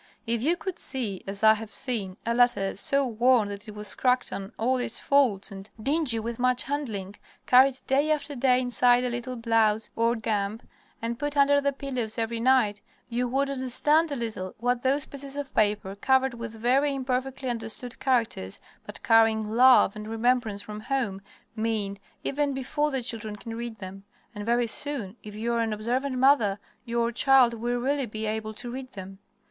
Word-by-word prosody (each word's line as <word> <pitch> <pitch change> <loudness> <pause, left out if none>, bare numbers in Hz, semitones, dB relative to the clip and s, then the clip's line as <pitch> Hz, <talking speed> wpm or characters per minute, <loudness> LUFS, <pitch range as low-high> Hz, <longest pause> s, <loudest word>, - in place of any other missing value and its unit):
If 230 -1 0
you 330 +7 +1
could 375 0 -5
see, 225 -8 0
as 195 +2 -5
I 220 0 +8
have 220 0 -7
seen, 205 -6 -3
a 235 - +1
letter, 240 -5 +2
so 275 +7 +2
worn 240 -2 +3
that 205 +2 -7
it 210 - -9
was 210 -2 -3
cracked 250 -1 +1
on 195 +1 -6
all 255 +3 +1
its 245 -2 -1
folds 255 -9 +2
and 195 +1 -9
dingy 275 0 +1
with 230 +1 -4
much 250 -1 +2
handling, 220 -9 -4 0.3
carried 260 +1 +5
day 280 +3 +2
after 295 -1 -1
day 250 0 +3
inside 245 0 +3
a 250 - -1
little 245 +1 -4
blouse, 225 -2 +1
or 230 +1 +2
guimpe, 215 -1 -2 0.4
and 235 0 -3
put 290 0 -3
under 285 0 +5
the 280 0 +1
pillows 255 -5 -4
every 230 0 -2
night, 230 -4 +2 0.3
you 245 +1 -1
would 275 +3 0
understand 290 +5 +2
a - - -1
little 220 -7 -5
what 245 +1 0
those 270 +2 +1
pieces 280 0 -7
of 285 -2 -5
paper, 205 -2 +1
covered 265 +4 +2
with 230 -1 -6
very 260 +6 +1
imperfectly 260 0 -3
understood 235 +1 -4
characters, 235 - -1 0.3
but - - -9
carrying 220 -1 +3
love 245 -3 +6
and 210 0 -7
remembrance 225 -2 0
from 210 0 -7
home, 220 -5 -2 0.3
mean, 215 -3 -2 0.2
even 285 0 -1
before 295 +3 -1
the 265 -3 -2
children 225 -3 -4
can 225 +2 -8
read 235 -1 -6
them. 195 0 -9 0.3
And 205 0 -7
very 240 +1 +2
soon, 230 -4 -2
if 210 -1 -10
you 230 +2 -2
are 235 - 0
an 225 -1 0
observant 250 +5 -2
mother, 250 -7 +4 0.3
your 235 0 0
child 255 0 +5
will 240 +2 -2
really 270 +1 -1
be 215 0 -5
able 215 0 -3
to 240 +2 -6
read 260 +1 -7
them. 190 0 -9
235 Hz, 185 wpm, -26 LUFS, 215-265 Hz, 0.4 s, I